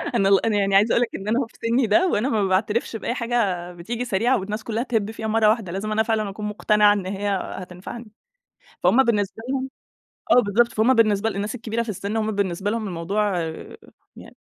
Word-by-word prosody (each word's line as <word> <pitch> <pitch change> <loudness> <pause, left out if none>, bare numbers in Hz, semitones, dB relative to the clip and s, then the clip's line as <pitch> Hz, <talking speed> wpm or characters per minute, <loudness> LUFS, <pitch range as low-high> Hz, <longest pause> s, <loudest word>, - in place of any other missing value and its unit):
أنا 195 -4 +3
ال 195 +2 +4
أنا 220 -2 +1
يعني 195 -1 +1
عايزة 210 +3 +5
أقول - - +3
لك 245 - +1
إن 195 - -7
أنا 230 +4 +2
أهو 260 - -1
في - - -26
سني 235 0 +2
ده، 345 - +4
وأنا 255 - 0
ما 215 -6 +1
باعترفش 210 +5 0
بأي 225 - -3
حاجة 220 -8 -1
بتيجي 230 +8 -5
سريعة 235 +5 +1
والناس 210 +3 -5
كلّها 230 +1 -2
تهب 220 -4 -1
فيها 220 -1 -5
مرّة 220 -1 +3
واحدة، 215 -5 0
لازم 200 +4 -4
أنا 220 +1 +2
فعلًا 215 -2 -1
أكون 210 +2 -6
مقتنعة 210 0 +3
إن 200 -3 -3
هي 200 +2 -3 0.3
هتنفعني. 190 +5 -9 0.7
فهُم 265 +3 +5
بالنسبة 210 -1 -1
لهم 265 0 -2 0.6
آه، 250 - +7
بالضبط 230 +4 +2
فهُم 225 +4 +3
بالنسبة 220 -2 +2
للناس 205 +2 -4
الكبيرة 230 -1 -3
في 235 - -9
السن، 205 +1 -4
هُم 220 -1 0
بالنسبة 200 -1 -1
لهم 225 -1 -2
الموضوع 190 +3 -1
آآ 160 -1 -6 0.4
يعني - - -13
215 Hz, 210 wpm, -23 LUFS, 200-230 Hz, 0.7 s, آه